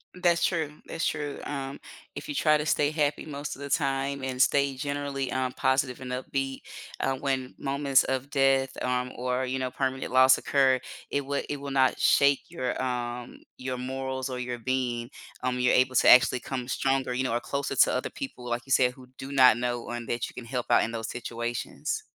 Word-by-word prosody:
That's 175 Hz, -2 st, +2 dB
true, 160 Hz, -5 st, 0 dB
that's 165 Hz, -, -3 dB
true, 150 Hz, -2 st, -2 dB
um, 135 Hz, -1 st, -5 dB, 0.4 s
if -, -, -7 dB
you -, -, -2 dB
try 155 Hz, -, +4 dB
to 150 Hz, -, -3 dB
stay 150 Hz, -1 st, +2 dB
happy 150 Hz, -2 st, 0 dB
most 145 Hz, -1 st, -5 dB
of 140 Hz, -, -13 dB
the 140 Hz, -, -5 dB
time 135 Hz, 0 st, 0 dB
and 130 Hz, -1 st, -1 dB
stay 140 Hz, 0 st, +3 dB
generally, 140 Hz, -1 st, -3 dB
um, 130 Hz, -1 st, -1 dB
positive 130 Hz, -1 st, 0 dB
and 130 Hz, -1 st, -7 dB
upbeat, 135 Hz, +1 st, -3 dB, 0.4 s
uh, 135 Hz, -, +1 dB
when 130 Hz, -1 st, -2 dB
moments 140 Hz, -1 st, +2 dB
of 130 Hz, +1 st, -2 dB
death, 135 Hz, -1 st, +3 dB
um, 125 Hz, 0 st, -1 dB
or, 125 Hz, +1 st, -1 dB
you 130 Hz, +1 st, -2 dB
know, 130 Hz, -1 st, -1 dB
permanent 130 Hz, 0 st, -2 dB
loss 130 Hz, 0 st, +7 dB
occur, 135 Hz, -2 st, +3 dB, 0.3 s
it 140 Hz, -1 st, -1 dB
would 140 Hz, +1 st, -2 dB
it 145 Hz, -, -2 dB
will 140 Hz, 0 st, -6 dB
not 130 Hz, -1 st, +3 dB
shake 140 Hz, 0 st, +4 dB
your, 130 Hz, -8 st, -3 dB
um 125 Hz, -1 st, -4 dB, 0.2 s
your 130 Hz, 0 st, -4 dB
morals 130 Hz, +1 st, -3 dB
or 125 Hz, -1 st, -4 dB
your 125 Hz, -1 st, -3 dB
being, 120 Hz, -1 st, -1 dB, 0.3 s
um, 125 Hz, 0 st, 0 dB
you're 125 Hz, -, +3 dB
able 130 Hz, 0 st, +3 dB
to -, -, +5 dB
actually 125 Hz, 0 st, +7 dB
come 125 Hz, -1 st, -5 dB
stronger, 135 Hz, -1 st, 0 dB
you 130 Hz, -, 0 dB
know, 130 Hz, -, -1 dB
or 120 Hz, -, +1 dB
closer 140 Hz, +2 st, -3 dB
to -, -, +5 dB
other 130 Hz, -, -1 dB
people, 265 Hz, -, -7 dB
like 120 Hz, 0 st, -1 dB
you 135 Hz, -, -10 dB
said, 125 Hz, -1 st, +5 dB
who 130 Hz, 0 st, -15 dB
do 135 Hz, +1 st, -7 dB
not 130 Hz, -3 st, +6 dB
know 120 Hz, 0 st, -2 dB
and 120 Hz, -1 st, -5 dB
that 120 Hz, 0 st, -2 dB
you -, -, -15 dB
can 120 Hz, -, -8 dB
help 125 Hz, 0 st, -3 dB
out -, -, +6 dB
in 115 Hz, -, -2 dB
those 115 Hz, -1 st, -4 dB
situations. 120 Hz, -, -4 dB
130 Hz, 210 wpm, -27 LUFS, 125-140 Hz, 0.4 s, loss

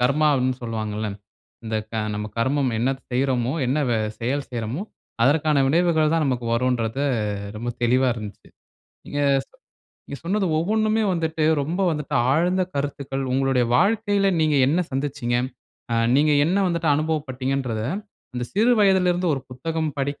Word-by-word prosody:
கர்மா 140 Hz, +5 st, +3 dB
அப்டின்னு 130 Hz, -1 st, 0 dB
சொல்வாங்க 110 Hz, -2 st, -3 dB
இல்ல. 110 Hz, -1 st, -2 dB, 0.6 s
இந்த 110 Hz, 0 st, -2 dB, 0.2 s
க -, -, -15 dB, 0.2 s
நம்ம 105 Hz, +1 st, -3 dB
கர்மம் 130 Hz, +3 st, +1 dB
என்ன 120 Hz, +4 st, +1 dB, 0.2 s
செய்றோமோ 125 Hz, -1 st, 0 dB
என்ன 135 Hz, +5 st, +1 dB
வே 115 Hz, -, +2 dB, 0.2 s
செயல் 135 Hz, +4 st, -2 dB
செய்றோமோ 120 Hz, -, -3 dB, 0.4 s
அதற்கான 150 Hz, +1 st, +3 dB
விளைவுகள் 160 Hz, 0 st, +3 dB
தான் 165 Hz, -2 st, +2 dB
நமக்கு 125 Hz, -3 st, -1 dB
வரும்ன்றது 120 Hz, +1 st, 0 dB, 0.5 s
ரொம்ப 120 Hz, +3 st, -4 dB
தெளிவா 130 Hz, +2 st, +3 dB
இருந்துச்சி. 105 Hz, -3 st, -9 dB, 0.6 s
நீங்க 145 Hz, -, -3 dB, 0.3 s
சொ -, -, -46 dB, 0.5 s
நீங்க 140 Hz, -, -7 dB
சொன்னது 195 Hz, +2 st, 0 dB
ஒவ்வொன்னுமே 215 Hz, +5 st, +1 dB
வந்துட்டு 160 Hz, -2 st, -1 dB, 0.2 s
ரொம்ப 170 Hz, +7 st, -3 dB
வந்துட்டு 150 Hz, -3 st, -3 dB, 0.2 s
ஆழ்ந்த 180 Hz, +6 st, +2 dB
கருத்துக்கள் 140 Hz, -1 st, -3 dB
உங்களுடைய 135 Hz, -1 st, +2 dB
வாழ்க்கையில 205 Hz, -, +2 dB
நீங்க 155 Hz, -2 st, +2 dB
என்ன 155 Hz, +6 st, +2 dB
சந்தித்திச்சீங்க. 135 Hz, -3 st, -1 dB, 0.6 s
அ -, -, +2 dB, 0.2 s
நீங்க 150 Hz, +1 st, +4 dB
என்ன 180 Hz, -, +1 dB
வந்துட்டு 170 Hz, -2 st, -1 dB
அனுபவப்பட்டீங்கன்றத 135 Hz, -6 st, -2 dB, 0.5 s
அந்த 125 Hz, -, -2 dB
சிறு 225 Hz, +6 st, +3 dB
வயதிலருந்து 180 Hz, -3 st, +3 dB
ஒரு 135 Hz, -, -4 dB
புத்தகம் 160 Hz, +5 st, -2 dB
படிக்க 140 Hz, +1 st, -2 dB
140 Hz, 145 wpm, -23 LUFS, 125-165 Hz, 0.6 s, நீங்க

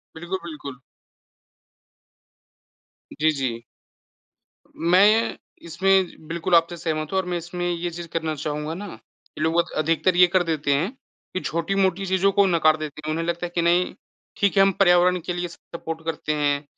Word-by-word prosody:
बिल्कुल, 175 Hz, +3 st, -4 dB
बिल्कुल। 145 Hz, -5 st, -8 dB, 2.4 s
जी, 155 Hz, +1 st, +3 dB
जी। 115 Hz, -3 st, -2 dB, 1.1 s
मैं 180 Hz, +4 st, +4 dB
ये 220 Hz, +2 st, +3 dB, 0.3 s
इसमें 185 Hz, -1 st, +1 dB
बिल्कुल 170 Hz, +1 st, 0 dB
आपसे 170 Hz, +1 st, +3 dB
सहमत 155 Hz, -2 st, -3 dB
हूँ 190 Hz, -, 0 dB
और 185 Hz, -, -2 dB
मैं 175 Hz, -1 st, -2 dB
इसमें 175 Hz, +1 st, -4 dB
ये 175 Hz, 0 st, -2 dB
चीज़ 170 Hz, 0 st, -7 dB
करना 160 Hz, -2 st, -1 dB
चाहूँगा 150 Hz, +2 st, -4 dB
ना 200 Hz, +4 st, -6 dB, 0.5 s
कि -, -, -7 dB
लोग 165 Hz, +2 st, +2 dB
अध 170 Hz, -, 0 dB
अधिकतर 165 Hz, +4 st, +1 dB
ये 180 Hz, 0 st, +7 dB
कर 180 Hz, 0 st, +2 dB
देते 150 Hz, -4 st, 0 dB
हैं 170 Hz, -, 0 dB, 0.4 s
कि 185 Hz, -, -1 dB
छोटी-मोटी 190 Hz, +3 st, 0 dB
चीज़ों 190 Hz, +1 st, +2 dB
को 200 Hz, 0 st, +4 dB
नकार 155 Hz, -3 st, +3 dB
देते 150 Hz, -1 st, -7 dB
हैं। 155 Hz, -, -1 dB
उन्हें 165 Hz, +1 st, -1 dB
लगता 170 Hz, +1 st, -2 dB
है -, -, -5 dB
कि 170 Hz, -, +2 dB
नहीं 175 Hz, +2 st, +2 dB, 0.4 s
ठीक 200 Hz, 0 st, +2 dB
है -, -, +7 dB
हम 195 Hz, -, +4 dB
पर्यावरण 180 Hz, -1 st, +5 dB
के 180 Hz, -, -2 dB
लिए 175 Hz, 0 st, -3 dB
सपोर्ट 165 Hz, -1 st, -8 dB
करते 150 Hz, -1 st, -2 dB
हैं 145 Hz, -1 st, 0 dB
170 Hz, 170 wpm, -23 LUFS, 155-180 Hz, 2.4 s, ये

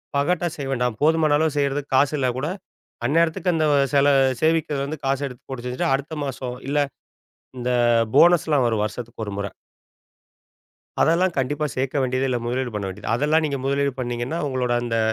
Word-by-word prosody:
பகட்டா 175 Hz, +5 st, +1 dB
செய்ய 140 Hz, -2 st, -5 dB
வேண்டாம். 125 Hz, -4 st, -1 dB
போதுமான 155 Hz, -1 st, +3 dB
அளவு 155 Hz, -1 st, 0 dB
செய்றதுக்கு 140 Hz, 0 st, -1 dB
காசு 140 Hz, +3 st, +3 dB
இல்லன்னா 130 Hz, -2 st, +1 dB
கூட, 145 Hz, +4 st, -2 dB, 0.6 s
அந்நேரத்துக்கு 165 Hz, +5 st, +2 dB
அந்த 160 Hz, -1 st, +1 dB, 0.3 s
சில 140 Hz, 0 st, +4 dB, 0.3 s
சேமிப்புலருந்து 155 Hz, -2 st, 0 dB
காசை 135 Hz, +1 st, 0 dB
எடுத்து 125 Hz, -2 st, -12 dB
போட்டு 125 Hz, -2 st, -6 dB
செஞ்சுட்டு, 125 Hz, +1 st, -1 dB
அடுத்த 145 Hz, +3 st, -3 dB
மாசம் 125 Hz, -2 st, -5 dB
இல்ல, 145 Hz, -, 0 dB, 0.8 s
இந்த 125 Hz, 0 st, -2 dB, 0.5 s
போனஸ்லாம் 160 Hz, -5 st, +5 dB
வரும் 110 Hz, -2 st, 0 dB
வருஷத்துக்கு 115 Hz, +1 st, -6 dB
ஒரு 100 Hz, -, -5 dB
முறை. 100 Hz, -1 st, -3 dB, 1.5 s
அதெல்லாம் 175 Hz, +2 st, +2 dB
கண்டிப்பா 145 Hz, +3 st, 0 dB
சேர்க்க 135 Hz, +2 st, 0 dB
வேண்டியதே 130 Hz, +1 st, 0 dB
இல்ல. 125 Hz, -1 st, 0 dB
முதலீடு 125 Hz, +1 st, -2 dB
பண்ண 105 Hz, -, -3 dB
வேண்டியது. 105 Hz, +3 st, -4 dB
அதெல்லாம் 150 Hz, +5 st, +2 dB
நீங்க 140 Hz, -2 st, -2 dB
முதலீடு 140 Hz, 0 st, +1 dB
பண்ணீங்கன்னா, 120 Hz, +6 st, -3 dB
உங்களோட 125 Hz, -2 st, -1 dB
அந்த 115 Hz, -1 st, -1 dB
135 Hz, 160 wpm, -23 LUFS, 125-150 Hz, 1.5 s, போனஸ்லாம்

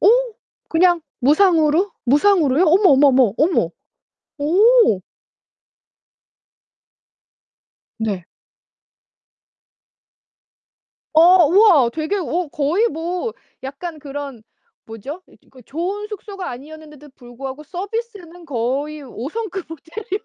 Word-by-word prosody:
어 385 Hz, -, +5 dB, 0.6 s
그냥 345 Hz, +1 st, +3 dB, 0.2 s
무상으로? 320 Hz, +4 st, +3 dB
무상으로요? 295 Hz, +2 st, +3 dB
어머, 360 Hz, +3 st, +4 dB
어머, 280 Hz, +1 st, +5 dB
어머, 255 Hz, -6 st, +3 dB
어머, 330 Hz, +4 st, +1 dB, 0.7 s
어. 370 Hz, -, +4 dB, 3.0 s
네. 205 Hz, -6 st, -3 dB, 2.9 s
어 345 Hz, +2 st, +6 dB
우와 350 Hz, -, +5 dB
되게 315 Hz, +9 st, -3 dB
어 350 Hz, -2 st, -2 dB
거의 315 Hz, +11 st, 0 dB
뭐 355 Hz, +5 st, -4 dB, 0.3 s
약간 295 Hz, +5 st, -7 dB
그런 280 Hz, -4 st, -8 dB, 0.4 s
뭐죠? 265 Hz, -, -9 dB, 0.4 s
좋은 370 Hz, -, -4 dB
숙소가 400 Hz, -2 st, -7 dB
아니었는데도 300 Hz, +3 st, -12 dB
불구하고 260 Hz, +3 st, -9 dB
서비스는 380 Hz, -1 st, -7 dB
거의 285 Hz, +3 st, -3 dB
5 255 Hz, -1 st, -7 dB
성급 395 Hz, -2 st, -6 dB
호텔이었네요. 385 Hz, +6 st, -7 dB
320 Hz, 195 characters per minute, -19 LUFS, 275-370 Hz, 3.0 s, 어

